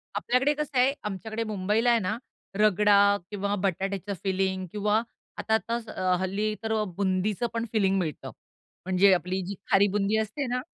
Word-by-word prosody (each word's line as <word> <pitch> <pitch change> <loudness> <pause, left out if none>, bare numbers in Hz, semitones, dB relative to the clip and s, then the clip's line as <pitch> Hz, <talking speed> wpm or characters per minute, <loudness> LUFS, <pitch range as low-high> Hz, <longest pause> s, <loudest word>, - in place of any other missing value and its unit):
आपल्याकडे 265 +4 +2
कसं 295 -2 -4
आहे, 255 +2 +4
आमच्याकडे 220 +3 -4
मुंबईला 215 +3 0
आहे 235 -1 +4
ना, 215 +3 -2 0.4
रगडा 210 0 +4 0.4
किंवा 200 0 -1
बटाट्याचं 195 +1 -2
फिलिंग 190 -1 -1
किंवा 210 +1 +1 0.4
आता 220 - -1
आताच 230 +1 -1
अ, - - -6 0.2
हल्ली 200 +3 -1
तर 220 0 -1
अ, 215 -1 +1
बुंदीच 190 +1 0
पण 230 0 -2
फिलिंग 195 -3 +2
मिळतं. 160 -5 -4 0.5
म्हणजे 190 +1 +5
आपली 185 +1 -1
जी 200 +2 -5 0.2
खारी 195 +1 +5
बुंदी 205 +1 +1
असते 220 +6 -2
ना 250 +1 -1
205 Hz, 160 wpm, -27 LUFS, 190-220 Hz, 0.5 s, म्हणजे